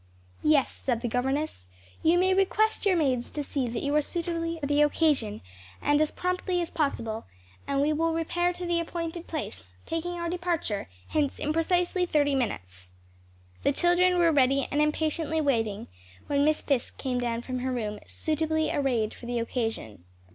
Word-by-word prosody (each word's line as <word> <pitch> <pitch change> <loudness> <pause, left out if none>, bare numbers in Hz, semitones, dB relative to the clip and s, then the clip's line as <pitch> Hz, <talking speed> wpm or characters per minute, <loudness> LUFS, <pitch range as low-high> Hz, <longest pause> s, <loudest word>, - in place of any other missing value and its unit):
"Yes," 300 -3 +4
said 240 -3 -2
the 240 - -1
governess, 265 - -1 0.3
"you 335 +2 +4
may 375 +1 +4
request 415 +3 +2
your 380 - +4
maids 260 -6 +1
to 295 - -4
see 275 -2 -2
that 230 0 -3
you 285 +1 0
are 300 - +5
suitably 335 +1 -2
arrayed 325 - -11
for - - -1
the 290 +1 +3
occasion, 295 -8 +2 0.4
and 290 +1 +3
as 310 - +3
promptly 365 0 -1
as 345 - -2
possible, 230 -7 -1 0.4
and 280 0 +1
we 300 +2 +2
will 330 +2 +1
repair 345 +2 0
to 355 0 -6
the 345 -1 +1
appointed 335 0 -4
place; 95 - -5 0.2
taking 330 +2 -2
our 340 -1 -3
departure 340 - -2 0.2
hence 295 -3 0
in 300 - -1
precisely 355 +2 +1
thirty 290 -3 +2
minutes." 95 - -3 0.7
The - - +3
children 355 +3 +3
were 340 -1 +5
ready 275 -2 +3
and 290 - +2
impatiently 315 +1 0
waiting, 225 -8 0 0.4
when 285 0 +2
Miss 310 0 +2
Fisk 270 -4 0
came 255 -2 -1
down 235 -1 -2
from 255 0 -3
her 260 +1 -2
room, 210 -4 -3
"suitably 315 0 0
arrayed 240 -6 0
for 240 - -10
the 245 0 -1
occasion." 225 - -3
295 Hz, 175 wpm, -28 LUFS, 250-335 Hz, 0.7 s, are